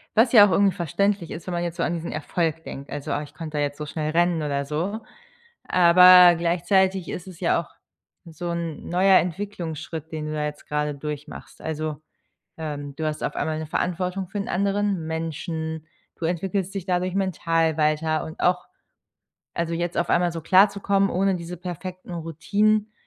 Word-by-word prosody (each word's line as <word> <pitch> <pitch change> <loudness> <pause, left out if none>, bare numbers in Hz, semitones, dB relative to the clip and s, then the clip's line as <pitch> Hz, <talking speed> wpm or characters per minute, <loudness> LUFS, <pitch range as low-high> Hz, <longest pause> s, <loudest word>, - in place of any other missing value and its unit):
was 230 +2 +5
ja 205 -4 +9
auch - - -1
irgendwie 195 +2 +3
verständlich 180 +2 0
ist, 160 - -7
wenn 180 - -3
man 175 - -1
jetzt 170 -1 -4
so 170 - 0
an 170 - 0
diesen 170 0 -4
Erfolg 160 +1 -2
denkt, 140 -2 -8
also: 145 - -5
„Ah, 145 - 0
ich 150 - -10
konnte 155 -3 -6
da 145 - +1
jetzt 145 0 -2
so 150 - -5
schnell 155 0 -3
rennen 170 -1 +2
oder 140 -1 -1
so“, 175 +10 -3 0.7
aber 180 0 +8
gleichzeitig 180 +2 +1
ist 180 - -6
es 185 -3 -11
ja - - +2
auch - - -15 0.6
so 170 +1 -6
'n 170 -2 -4
neuer 185 +2 +5
Entwicklungsschritt, 165 -4 -5
den 155 -1 -4
du 155 - -4
da 150 -1 -1
jetzt 150 0 -7
grade 150 0 -1
durchmachst. 150 +1 -8
Also, 155 -1 -4 0.6
ähm, 145 -3 -5
du 160 0 -3
hast 155 0 -3
auf - - -2
einmal 155 -1 -1
'ne 160 - -4
Verantwortung 180 +3 -2
für 205 - -6
'n 200 - -3
anderen 200 -2 0
Menschen, 160 0 -4 0.3
du 165 - -3
entwickelst 190 +3 -2
dich 190 - -4
dadurch 185 0 -1
mental 165 -4 +1
weiter 155 +1 +1
und 160 - -9
auch 180 - +1 0.9
also 170 0 -1
jetzt 170 +1 -2
auf - - 0
einmal 175 0 +3
so 165 - -5
klarzukommen, 195 +2 +4
ohne 195 +1 +1
diese 175 0 -6
perfekten 180 +1 -7
Routinen, 200 +7 0
170 Hz, 185 wpm, -24 LUFS, 155-185 Hz, 0.9 s, ja